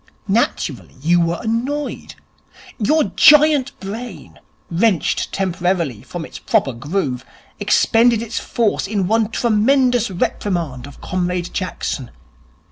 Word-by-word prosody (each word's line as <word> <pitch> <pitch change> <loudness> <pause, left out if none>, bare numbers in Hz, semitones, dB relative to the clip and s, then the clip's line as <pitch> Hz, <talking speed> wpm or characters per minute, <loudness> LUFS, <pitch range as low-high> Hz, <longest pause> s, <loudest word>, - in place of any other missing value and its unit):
Naturally, 195 - -1
you 170 +5 +3
were 170 0 0
annoyed. 255 +6 -3 0.6
Your 305 +9 +3
giant 300 -2 +5
brain, 195 - -8 0.3
wrenched 185 -1 +1
temporarily 175 - -1
from 175 -2 -7
its - - -10
proper 135 - +1
groove, 135 -1 -3 0.4
expended 230 -1 +3
its 230 0 -4
force 225 -4 -1
in 200 -2 -1
one 220 +1 +2
tremendous 240 +2 +2
reprimand 170 -8 -2
of 140 - -14
Comrade 180 -1 -2
Jackson. 145 -8 -3
195 Hz, 110 wpm, -19 LUFS, 170-235 Hz, 0.6 s, giant